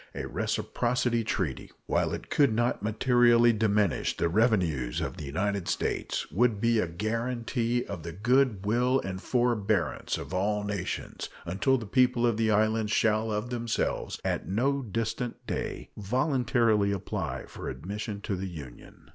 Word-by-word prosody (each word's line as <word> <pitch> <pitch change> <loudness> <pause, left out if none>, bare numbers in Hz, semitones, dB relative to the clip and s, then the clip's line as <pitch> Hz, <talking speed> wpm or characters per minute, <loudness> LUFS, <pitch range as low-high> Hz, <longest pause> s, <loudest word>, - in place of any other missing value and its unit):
A - - -3
reciprocity 120 -1 0
treaty, 95 -10 -2 0.2
while - - +1
it - - -6
could 140 -4 +4
not 120 0 0
materially 120 +2 +4
diminish 105 -4 +1
the 85 - +1
revenues 85 - +1
of - - -4
the 75 - -6
United 95 +5 -1
States, - - -2
would 115 0 +2
be 115 +1 +3
a 90 - +1
guaranty 115 +5 -1
of 100 -4 -6
the 85 +1 -6
good 110 +2 +2
will 125 +5 +2
and 95 -1 -5
forbearance 115 -4 0
of - - -7
all 105 +3 0
nations 100 -3 -4 0.2
until 100 +10 +2
the 115 - -6
people 125 +1 +3
of 120 -2 +2
the 110 -1 +2
islands 110 0 +2
shall 110 +1 +2
of 105 +3 -2
themselves, 120 -2 -2
at - - -1
no 135 +8 +1
distant 115 +1 -3
day, - - -4
voluntarily 115 -2 +2
apply 100 -2 -3
for - - -7
admission 100 - -5
into 100 0 -3
the 95 +1 -4
Union. 70 -8 -11
110 Hz, 150 wpm, -28 LUFS, 100-120 Hz, 0.2 s, could